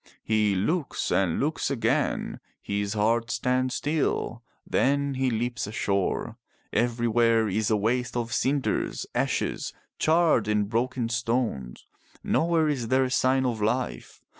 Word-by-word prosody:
He 105 -2 +2
looks 140 - -1
and 95 -4 +1
looks 150 +3 0
again. 135 -5 0 0.2
His 100 0 -2
heart 115 +2 +1
stands 125 +1 0
still. 145 -6 -1 0.2
Then 140 +1 +1
he 130 0 0
leaps 120 -1 -2
ashore. 100 -3 -1 0.4
Everywhere 115 -1 +2
is 105 +2 0
a 110 - +3
waste 120 +4 0
of 115 -1 -2
cinders, 140 0 0
ashes, - - -1 0.3
charred 160 -8 +3
and 105 -1 +1
broken 120 +2 -1
stones. 115 - -2 0.4
Nowhere 165 -1 +2
is 135 -6 -1
there 130 +2 +3
a 130 - -2
sign 130 +1 +2
of 115 -4 -1
life. 125 +5 -2
120 Hz, 130 wpm, -26 LUFS, 110-130 Hz, 0.4 s, a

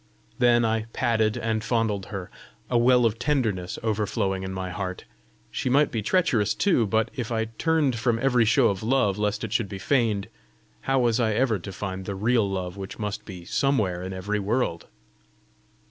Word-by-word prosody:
Then 120 -1 +4
I 110 0 0
patted 110 -3 +1
and 110 -1 -1
fondled 110 -4 0
her, 95 -3 -6 0.4
a 120 - +3
well 125 0 +5
of 115 0 0
tenderness 115 -11 -1
overflowing 105 -3 -1
in 95 0 -5
my 95 -1 -4
heart: 95 -1 -5 0.5
she - - -2
might 140 +3 +3
be 115 - -1
treacherous 110 - +2
too, 170 - +2
but 110 +2 +1
if 120 -3 -4
I 110 -1 0
turned 155 -7 +2
from 115 0 +1
every 125 -1 +3
show 120 +2 +4
of 100 -2 -3
love 110 -4 +1
lest 105 +1 -1
it 110 -1 -4
should 115 -4 0
be 100 - -6
feigned, 110 -3 +1 0.6
how 135 - +3
was 120 -1 +2
I 110 -3 +2
ever 115 -4 +2
to 100 +3 -8
find 95 -1 -5
the 100 - -4
real 110 +1 +2
love 95 -1 -4
which 95 -1 -7
must 105 0 -4
be 90 -4 -9
somewhere 105 -7 0
in 95 +1 -5
every 100 +3 -2
world? 100 -4 -1
110 Hz, 185 wpm, -25 LUFS, 100-120 Hz, 0.6 s, well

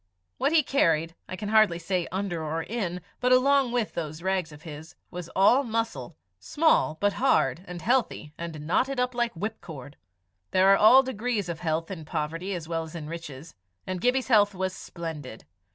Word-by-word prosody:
What 275 - +2
he 320 -2 +5
carried 165 - +1 0.2
I - - -4
can 205 +2 -5
hardly 215 -5 +4
say 175 0 -2
under 185 -4 -3
or 160 +1 -2
in, 180 -5 -3 0.2
but 250 0 +1
along 265 0 +4
with 240 -3 -1
those 155 0 -5
rags 190 -4 -1
of 150 +1 -13
his, 155 0 -10 0.2
was 175 -1 -7
all 205 +8 +5
muscle 225 - -3 0.2
small, 290 - +2
but 205 0 +2
hard 255 -8 +2
and 175 -2 -7
healthy, 230 - 0
and 160 -3 -7
knotting 255 - +1
up 250 0 0
like 240 -1 0
whipcord. 160 - -7 0.5
There 190 +1 +5
are - - +7
all 250 +7 +7
degrees 230 -6 -2
of 165 -1 -4
health 165 +1 -2
in 170 -4 -6
poverty 165 +4 -3
as 165 -3 -6
well 165 -1 -2
as 160 +1 -9
in 155 -2 -6
riches, 165 -2 -8 0.3
and 185 -1 -4
Gibbie's 250 +2 +1
health 205 -4 +4
was 185 0 -2
splendid. 155 -9 -8
185 Hz, 185 wpm, -27 LUFS, 160-230 Hz, 0.5 s, are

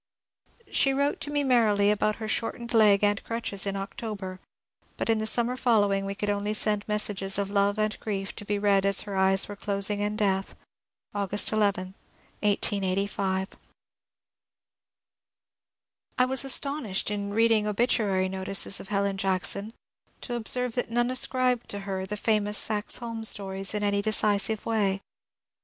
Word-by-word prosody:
She 270 -1 +3
wrote 280 +1 0
to 290 - -3
me 290 0 0
merrily 215 -6 +3
about 210 0 0
her 220 - -6
shortened 235 +2 -3
leg 210 -3 +5
and 205 0 +1
crutches 215 -4 -2
in 195 - -2
October, 195 -1 -6 0.6
but - - 0
in 220 - +1
the 220 - -2
summer 240 +2 +2
following 205 -6 +1
we 200 - -4
could 210 0 -2
only 205 +1 -2
send 210 -1 +3
messages 205 -2 +1
of 200 -1 -2
love 200 0 +1
and 215 0 -1
grief 195 -3 -4
to - - -5
be 205 0 -2
read 200 -1 +2
as 200 0 +3
her 200 -2 -6
eyes 190 0 +3
were 205 - -7
closing 200 0 -1
in 205 +1 -2
death, 195 -3 -1 0.3
— - - -49
August 205 0 +1
11,*1885. 195 -1 -2 2.7
I 250 - +4
wafl 265 +1 +1
astonished 270 -8 +1
in 200 -1 -3
reading 225 0 +2
obituary 205 -3 +1
notices 190 +1 +1
of - - -10
Helen 200 -1 -1
Jack 190 -1 0
P - - +3
son 210 +3 -2 0.5
to 245 - -6
observe 240 +1 +1
that 245 - -2
none 240 +1 +1
ascribed 255 -1 +1
to 200 - -4
her 190 -1 -4
the 210 +2 -4
famous 210 -1 +1
Saxe 210 -1 +2
Holm 230 -2 -6
stories 195 -2 +1
in 210 - -1
any 200 0 +1
decisive 215 0 0
way. 200 -4 0
205 Hz, 160 wpm, -26 LUFS, 195-225 Hz, 2.7 s, leg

